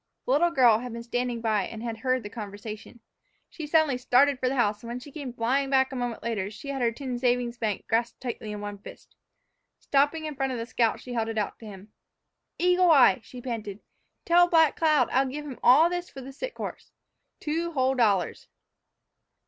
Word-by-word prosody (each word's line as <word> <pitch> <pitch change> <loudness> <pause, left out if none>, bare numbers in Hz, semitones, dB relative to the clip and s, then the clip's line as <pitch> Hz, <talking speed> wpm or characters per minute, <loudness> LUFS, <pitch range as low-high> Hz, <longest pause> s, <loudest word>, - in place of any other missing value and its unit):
The - - -1
little 320 +6 +4
girl 245 -8 +4
had 245 -1 -7
been 235 0 -6
standing 245 0 -2
by 215 -3 0
and 225 0 -8
had 230 -1 -4
heard 255 0 0
the 205 - -7
conversation. 215 +2 -8 0.5
She 315 -3 -7
suddenly 295 -4 +2
started 255 +2 +3
for 255 - 0
the 270 - -2
house, 210 -4 +1
and, 235 - -10
when 240 +1 -5
she 280 +3 -12
came 280 -4 -6
flying 255 +4 0
back 265 0 +3
a - - -6
moment 245 -2 -4
later, 210 -5 -2
she 250 +6 -10
had 275 -2 -3
her 235 -1 +2
tin 250 0 -5
savings 245 -1 0
bank 215 -4 -2
grasped 230 +1 -1
tightly 235 -4 -5
in 210 0 -6
one 205 -1 -6
fist. - - -14 0.6
Stopping 290 +3 +1
in 305 - -4
front 270 -1 -2
of - - -3
the 230 - -4
scout, 230 -1 0
she 250 - -8
held 225 -2 -1
it 225 -1 -4
out 210 -2 -2
to 225 - -11
him. 200 +1 -12 0.7
"Eagle 360 0 +3
Eye," 275 -4 +6
she 245 +4 -11
panted, 215 -5 -5 0.5
"tell 350 +1 +5
Black 320 -4 +4
Cloud 305 -6 +3
I'll 265 +1 +2
give 295 +3 -6
him 270 -4 -8
all 275 +7 +6
this 355 0 -4
for 270 - -10
the 265 +1 -9
sick - - -6
horse - - -7 0.5
two 330 +3 -2
whole 260 -2 +2
dollars." 205 -9 +1
250 Hz, 215 wpm, -27 LUFS, 230-280 Hz, 0.7 s, Eye